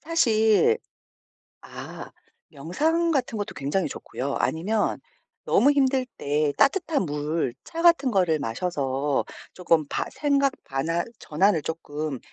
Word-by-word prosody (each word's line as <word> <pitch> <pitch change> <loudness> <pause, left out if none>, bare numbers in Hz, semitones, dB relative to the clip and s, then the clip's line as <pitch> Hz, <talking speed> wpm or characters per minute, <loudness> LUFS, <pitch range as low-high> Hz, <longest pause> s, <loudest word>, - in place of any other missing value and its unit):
사실 295 - +3 0.8
아 - - -9 0.4
명상 310 - 0
같은 255 -6 -1
것도 205 - -4
굉장히 145 +5 -1
좋고요. 135 0 -5
아니면 205 +7 0 0.5
너무 285 +3 +4
힘들 265 -2 +2
때 145 +1 0
따뜻한 305 - +2
물, 150 -2 -2
차 330 - -6
같은 335 -6 +5
거를 175 -6 +2
마셔서 140 +1 -1 0.3
쪼끔 165 -4 +1
바 - - -2
생각 280 -2 +1
반환 160 +6 -2
전환을 170 +1 +2
쪼끔 150 -3 -4
180 Hz, 230 characters per minute, -25 LUFS, -, 0.8 s, 같은